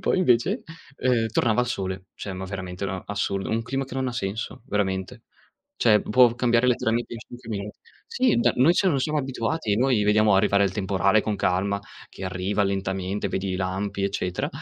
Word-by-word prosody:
Poi - - +1
invece 180 - +2 0.3
ehm, 120 -3 +1
tornava 115 +1 +2
il - - -3
sole, 95 -5 -4
cioè 100 - -6
ma 95 0 -5
veramente 95 -1 -5
una 95 -1 -3
assurdo. 100 -1 -2
Un 115 +1 0
clima 135 +3 -2
che 130 - -10
non 130 -1 -1
ha 125 - -4
senso, 110 +1 -4
veramente. 100 +3 -2 0.6
Cioè, 105 -3 +5
può 120 +1 +4
cambiare 120 0 +2
letteralmente 120 -1 0
in 115 - -6
5 120 +1 -12
minuti. 105 -1 -5 0.3
Sì 250 -2 +2
da 120 0 +3
noi, 140 +7 +5
cioè, 190 - +3
non 140 - +1
siamo 150 +3 0
abituati! 130 -3 -1
Noi 125 -3 +2
vediamo 105 -1 +4
arrivare 100 +1 +4
il 95 - 0
temporale 100 +1 +2
con 105 -2 -2
calma 95 +2 0 0.3
che 95 - -9
arriva 95 +3 -1
lentamente 95 0 -2
vedi 95 0 -2
i 90 - -1
lampi 95 +2 -2
eccetera 90 -2 -2
105 Hz, 190 wpm, -25 LUFS, 95-120 Hz, 0.6 s, Cioè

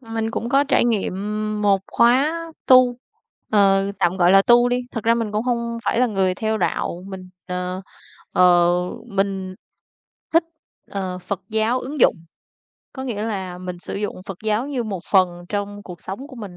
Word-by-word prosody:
Mình 225 -2 -3
cũng 230 +1 -3
có 275 +2 +3
trải 280 - +3
nghiệm 225 -6 0 0.5
một 200 -1 +4
khóa 260 +6 +4 0.3
tu, 255 -1 +6 0.5
ờ, 195 -1 +3
tạm 175 +2 +1
gọi 175 -1 +4
là 195 0 +7
tu 240 +3 +5
đi. 245 0 0
Thật 225 - -5
ra 230 +1 +4
mình 225 -3 -2
cũng 210 +1 0
hông 235 -1 -2
phải - - +1
là 250 - +4
người 190 -4 +1
theo 220 +2 -1
đạo, 175 -3 -2
mình, 190 -2 -8 0.2
ờ, 180 +1 -4 0.5
ờ, 175 -1 +5 0.4
mình 195 -3 -2 0.8
thích, 330 0 +4 0.5
ờ, 185 -2 -4
Phật 185 +1 -4
giáo 220 +3 +1
ứng 280 +2 -6
dụng. - - +5 0.8
Có 265 - -6
nghĩa 230 -6 -3
là 190 -5 -4
mình 180 -1 -6
sử - - -7
dụng 205 -2 -4
Phật 190 -2 -7
giáo 215 +4 0
như 260 -5 -2
một 200 -5 -4
phần 190 -2 +5 0.2
trong 205 0 -4
cuộc 180 -3 -10
sống 200 +9 -7
của 260 - -12
mình. 200 -6 -8
205 Hz, 180 wpm, -22 LUFS, 190-235 Hz, 0.8 s, là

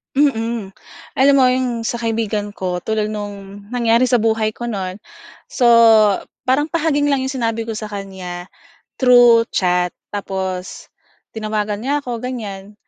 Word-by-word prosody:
Mm. 230 -7 0 0.5
Alam 275 +1 +6
mo 270 - +5
'yong 250 -2 -1
sa 235 +1 -2
kaibigan 220 -3 -2
ko 180 -1 -3
tulad 215 +2 -2
no'ng 205 -1 -8
nangyari 235 +1 +2
sa 250 - +2
buhay 220 -1 +1
ko - - -8
no'n. 195 -6 -3 0.6
So 245 - +2 0.8
parang 290 +4 +1
pahaging 300 -3 +1
lang 275 - +2
'yong 265 +1 -3
sinabi 230 -2 -2
ko 225 - -4
sa 215 0 -6
kanya, 190 -3 -7 0.5
through 245 -3 +6
chat 180 -1 +1 0.2
tapos 190 -2 -5 0.4
tinawagan 215 -1 -3
niya 280 +6 -1
ko 245 -3 -4
ganyan. 210 -5 -6
225 Hz, 140 wpm, -19 LUFS, 200-250 Hz, 0.8 s, Alam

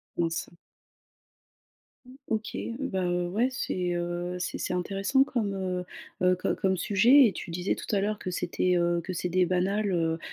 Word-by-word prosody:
Mince. 165 -1 -1 1.8
OK, 220 0 -2 0.2
bah 190 -9 -1
heu, 175 0 0
ouais 220 +7 +2
c'est, 180 -8 -2
heu, 175 +1 -3
c'est 180 - -3
c'est - - -2
intéressant 195 +8 +2
comme, 225 -7 -2
heu 185 -2 -2 0.4
heu, 180 0 +4
co 185 - -1
comme 190 -1 +1
sujet 230 +10 +6
et 210 - 0
tu 175 - -7
disais 180 +3 -1
tout - - -8
à 195 - +2
l'heure 210 +1 -1
que 185 - -4
c'était, 180 +1 0
heu, 175 0 +2
que 185 +2 -5
c'était 180 +1 +1
banal, 195 +3 0
heu 165 -1 0
185 Hz, 170 wpm, -28 LUFS, 175-200 Hz, 1.8 s, sujet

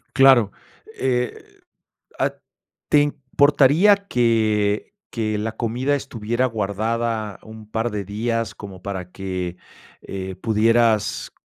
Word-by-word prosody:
Claro, 130 -7 +6 0.4
eh 125 -2 -1 0.8
ah, - - +1 0.6
¿te 150 - +6
importaría 145 +6 +4
que 110 - +1 0.2
que 110 -2 -2
la 110 +1 -3
comida 125 +4 0
estuviera 120 -2 -2
guardada 110 -1 -2
un 110 -1 -12
par 115 +1 -1
de 105 -1 -3
días 115 +2 -2
como 95 -3 -10
para 95 -2 -5
que, 90 -2 -4 0.5
eh, 95 -1 -6
pudieras, 110 +1 +2
110 Hz, 105 wpm, -22 LUFS, 105-120 Hz, 0.8 s, Claro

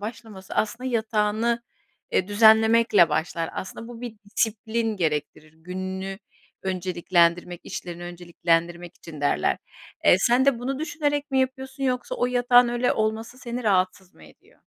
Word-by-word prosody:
başlaması 215 -3 -8
aslında 240 +4 -1
yatağını 225 +1 0 0.5
e, 185 - +1
düzenlemekle 220 -2 +5
başlar. 165 +2 -2
Aslında, 225 +4 -7
bu 240 -1 -10
bir 240 -3 -7
disiplin 220 +1 -1
gerektirir. 150 -2 -2
Gününü 185 +3 -5 0.4
önceliklendirmek, 175 -2 +1
işlerini 175 -1 -7
önceliklendirmek 175 0 -2
için 155 -3 -11
derler. 145 - +1 0.5
Eee, - - +7
sen 240 +5 +3
de 275 -4 +3
bunu 265 +3 -3
düşünerek 295 -3 -2
mi 265 -1 +2
yapıyorsun 265 +1 -3
yoksa 250 -1 -1
o 245 - 0
yatağın 245 0 +4
öyle 240 +1 +1
olması 220 +3 -2
seni 245 -1 -5
rahatsız 185 -2 0
mı - - -17
ediyor? - - -21
215 Hz, 135 wpm, -25 LUFS, 180-240 Hz, 0.5 s, Eee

